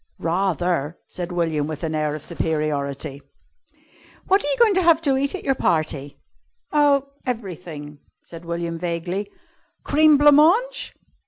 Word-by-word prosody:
"Rather!" 175 Hz, -3 st, -1 dB
said 180 Hz, 0 st, -6 dB
William 165 Hz, -4 st, -1 dB
with 155 Hz, 0 st, -6 dB
an 160 Hz, -1 st, -2 dB
air 155 Hz, -1 st, -1 dB
of 155 Hz, -, -8 dB
superiority. 145 Hz, -4 st, -3 dB, 1.0 s
"What 390 Hz, +2 st, +3 dB
are -, -, -2 dB
you -, -, +2 dB
going 465 Hz, -4 st, +5 dB
to 375 Hz, -, +2 dB
have 335 Hz, -3 st, +5 dB
to 280 Hz, -4 st, +2 dB
eat 280 Hz, +5 st, 0 dB
at 385 Hz, -, -7 dB
your 270 Hz, -, +2 dB
party?" 155 Hz, -, -1 dB, 0.5 s
"Oh 285 Hz, -2 st, +3 dB
everything," 175 Hz, -, -6 dB, 0.2 s
said 165 Hz, 0 st, -11 dB
William 170 Hz, 0 st, -4 dB
vaguely. 175 Hz, +4 st, -3 dB, 0.5 s
"Cream 305 Hz, 0 st, +5 dB
blanc 295 Hz, +1 st, +6 dB
mange?" 445 Hz, +12 st, +2 dB
175 Hz, 145 wpm, -22 LUFS, -, 1.0 s, blanc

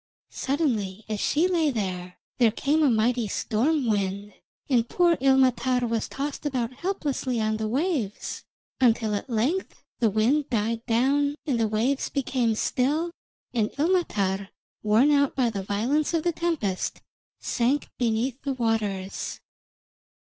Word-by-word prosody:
Suddenly, 225 Hz, -, -1 dB
as 215 Hz, -1 st, -3 dB
she 315 Hz, -, +2 dB
lay 335 Hz, -4 st, +2 dB
there, 185 Hz, -7 st, -3 dB, 0.2 s
there 235 Hz, -2 st, +6 dB
came 285 Hz, +8 st, +1 dB
a 295 Hz, -, +5 dB
mighty 235 Hz, 0 st, +2 dB
storm 255 Hz, +9 st, 0 dB
wind, 200 Hz, -1 st, -1 dB, 0.3 s
and 240 Hz, -4 st, +2 dB
poor 350 Hz, -2 st, +3 dB
Ilmatar 255 Hz, -2 st, +3 dB
was 225 Hz, -1 st, -1 dB
tossed 280 Hz, +2 st, -4 dB
about 255 Hz, -5 st, -2 dB
helplessly 280 Hz, -6 st, -2 dB
on 215 Hz, 0 st, 0 dB
the 220 Hz, 0 st, -2 dB
waves, 265 Hz, -, -2 dB, 0.4 s
until 230 Hz, -4 st, +3 dB
at 205 Hz, +6 st, -3 dB
length 255 Hz, -, -1 dB, 0.2 s
the 230 Hz, -3 st, +3 dB
wind 240 Hz, +8 st, +1 dB
died 230 Hz, 0 st, -1 dB
down 280 Hz, +5 st, +2 dB
and 265 Hz, -7 st, 0 dB
the 225 Hz, -, +2 dB
waves 235 Hz, +6 st, 0 dB
became 250 Hz, -4 st, 0 dB
still, 295 Hz, +10 st, 0 dB, 0.4 s
and 220 Hz, -3 st, +1 dB
Ilmatar, 205 Hz, -, 0 dB, 0.3 s
worn 220 Hz, +7 st, +4 dB
out 280 Hz, -1 st, +3 dB
by 245 Hz, -3 st, +2 dB
the 200 Hz, -2 st, -3 dB
violence 245 Hz, -, 0 dB
of 320 Hz, -, 0 dB
the 345 Hz, -, +2 dB
tempest, 315 Hz, -, -2 dB, 0.4 s
sank 255 Hz, +4 st, 0 dB
beneath 240 Hz, +2 st, 0 dB
the 275 Hz, -1 st, -2 dB
waters. 215 Hz, -6 st, -2 dB
245 Hz, 140 wpm, -26 LUFS, 215-285 Hz, 0.4 s, there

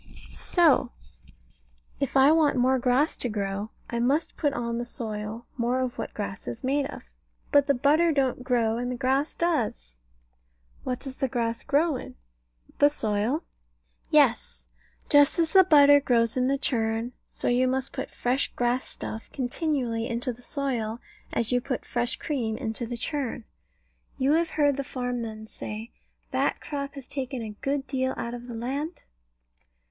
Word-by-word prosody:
So, 335 Hz, -6 st, +3 dB, 1.1 s
if 275 Hz, -1 st, 0 dB
I 270 Hz, +2 st, +7 dB
want 310 Hz, -3 st, +4 dB
more 260 Hz, +1 st, +3 dB
grass 255 Hz, +5 st, +2 dB
to 245 Hz, -, 0 dB
grow, 200 Hz, 0 st, -3 dB, 0.2 s
I 235 Hz, -, -3 dB
must 275 Hz, +7 st, +1 dB
put 290 Hz, -, +1 dB
on 235 Hz, -2 st, -2 dB
the -, -, -1 dB
soil 220 Hz, -1 st, -5 dB
more 245 Hz, +1 st, +1 dB
of 255 Hz, -1 st, -2 dB
what -, -, -5 dB
grass 200 Hz, -2 st, -5 dB
is 120 Hz, -, -5 dB
made 275 Hz, +1 st, +1 dB
of. -, -, -10 dB, 0.4 s
But 285 Hz, -1 st, +5 dB
the 280 Hz, -, +3 dB
butter 305 Hz, +6 st, +4 dB
don't 265 Hz, -4 st, 0 dB
grow, 235 Hz, -3 st, +1 dB
and 245 Hz, +1 st, -2 dB
the -, -, -2 dB
grass 265 Hz, +4 st, 0 dB
does. 65 Hz, -, -1 dB, 0.9 s
What 250 Hz, -1 st, -2 dB
does 270 Hz, -2 st, -4 dB
the 270 Hz, -, 0 dB
grass 230 Hz, -2 st, -1 dB
grow 295 Hz, 0 st, +2 dB
in? -, -, -9 dB, 0.6 s
The 290 Hz, -, +7 dB
soil. 225 Hz, +2 st, -1 dB, 0.7 s
Yes. 285 Hz, -6 st, +3 dB, 0.4 s
Just 290 Hz, +1 st, +5 dB
as 330 Hz, -2 st, +1 dB
the 380 Hz, -1 st, +9 dB
butter 285 Hz, -4 st, +7 dB
grows 230 Hz, -4 st, +2 dB
in 255 Hz, 0 st, +2 dB
the 275 Hz, +1 st, +2 dB
churn. 225 Hz, -3 st, 0 dB, 0.2 s
So -, -, -3 dB
you 250 Hz, +1 st, +3 dB
must 260 Hz, +1 st, -1 dB
put -, -, -4 dB
fresh 250 Hz, +3 st, 0 dB
grass 245 Hz, +1 st, +1 dB
stuff 220 Hz, -, -7 dB
continually 245 Hz, -3 st, -1 dB
into 240 Hz, +1 st, -2 dB
the 240 Hz, -, -17 dB
soil, 240 Hz, -5 st, -2 dB, 0.3 s
as 230 Hz, 0 st, 0 dB
you 245 Hz, 0 st, +2 dB
put 255 Hz, -1 st, -3 dB
fresh 240 Hz, +1 st, 0 dB
cream 235 Hz, -8 st, -2 dB
into 225 Hz, +2 st, -3 dB
the 240 Hz, 0 st, -4 dB
churn. 265 Hz, -3 st, -3 dB, 0.7 s
You 270 Hz, +1 st, +2 dB
have 330 Hz, +2 st, +3 dB
heard 290 Hz, -3 st, +2 dB
the 275 Hz, -, -1 dB
farm 250 Hz, -2 st, -3 dB
men 220 Hz, -1 st, -6 dB
say, 220 Hz, +1 st, -7 dB, 0.4 s
"That -, -, +1 dB
crop 280 Hz, -1 st, -5 dB
has 275 Hz, -3 st, -8 dB
taken 260 Hz, -3 st, -4 dB
a 215 Hz, -, -5 dB
good 275 Hz, +6 st, -2 dB
deal 260 Hz, -1 st, -1 dB
out 235 Hz, -, -4 dB
of 245 Hz, 0 st, -7 dB
the 240 Hz, -, -6 dB
land"? 280 Hz, +8 st, -4 dB
255 Hz, 170 wpm, -27 LUFS, 235-280 Hz, 1.1 s, the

